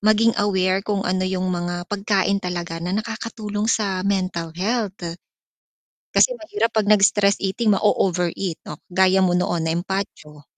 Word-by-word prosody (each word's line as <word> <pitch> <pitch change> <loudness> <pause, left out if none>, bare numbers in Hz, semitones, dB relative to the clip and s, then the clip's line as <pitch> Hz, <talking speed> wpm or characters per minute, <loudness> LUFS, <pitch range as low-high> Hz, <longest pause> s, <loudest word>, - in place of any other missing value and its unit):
maging 215 +2 +4
aware 190 -1 +1
kung 200 -1 -2
ano 185 +1 0
yung 185 0 -1
mga 175 0 -3
pagkain 200 -1 +1
talaga 175 -2 -4
na 180 +4 -2
nakakatulong 215 -1 -4
sa 200 -4 +1
mental 185 -4 -1
health. 210 +1 -1 1.2
Kasi - - +4
mahirap 320 - -2
'pag 215 - +3
nag 210 - +6
stress 200 0 +4
eating 210 +3 +1
mao-over 185 -3 +2
eat. 180 -5 -3
Oh 150 - -6 0.2
kagaya 190 +1 +4
mo 180 - +2
noon 175 -1 0
na 160 - 0
impatso. 170 -5 -4
195 Hz, 155 wpm, -22 LUFS, 180-210 Hz, 1.2 s, nag